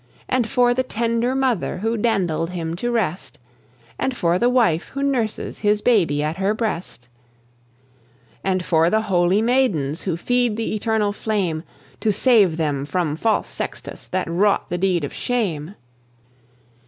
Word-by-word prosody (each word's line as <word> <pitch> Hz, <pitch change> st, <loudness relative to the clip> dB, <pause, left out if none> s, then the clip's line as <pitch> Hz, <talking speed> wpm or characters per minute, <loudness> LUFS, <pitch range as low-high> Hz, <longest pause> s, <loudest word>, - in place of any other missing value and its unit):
"And 245 Hz, -3 st, 0 dB
for 245 Hz, -2 st, +3 dB
the 255 Hz, -, +1 dB
tender 235 Hz, +1 st, -1 dB
mother 255 Hz, -10 st, 0 dB
Who 225 Hz, +4 st, -1 dB
dandled 190 Hz, -8 st, 0 dB
him 165 Hz, -2 st, -4 dB
to 240 Hz, +6 st, -2 dB
rest, 195 Hz, -7 st, -2 dB, 0.6 s
And 265 Hz, -2 st, -1 dB
for 170 Hz, +1 st, +1 dB
the 240 Hz, -, +3 dB
wife 225 Hz, -10 st, +2 dB
who 275 Hz, -, -1 dB
nurses 245 Hz, -6 st, -1 dB
His 210 Hz, 0 st, +1 dB
baby 170 Hz, -12 st, +3 dB
at 155 Hz, +3 st, -2 dB
her 195 Hz, +2 st, +1 dB
breast, 185 Hz, -, -4 dB, 1.4 s
And 185 Hz, -1 st, 0 dB
for 165 Hz, 0 st, +3 dB
the 220 Hz, +3 st, +2 dB
holy 185 Hz, 0 st, +2 dB
maidens 200 Hz, -, +1 dB
Who 175 Hz, -4 st, -2 dB
feed 245 Hz, +2 st, +1 dB
the 225 Hz, -, -2 dB
eternal 215 Hz, -1 st, 0 dB
flame, 195 Hz, -8 st, -1 dB, 0.4 s
To 220 Hz, -, +1 dB
save 205 Hz, -7 st, +4 dB
them 145 Hz, -4 st, -1 dB
from 155 Hz, 0 st, -1 dB
false 220 Hz, +7 st, 0 dB
Sextus -, -, -6 dB
That 185 Hz, -1 st, -2 dB
wrought 190 Hz, +4 st, +1 dB
the 175 Hz, -, -1 dB
deed 180 Hz, -3 st, +1 dB
of 145 Hz, -, -4 dB
shame? 195 Hz, -8 st, -2 dB
205 Hz, 155 wpm, -21 LUFS, 170-230 Hz, 1.4 s, save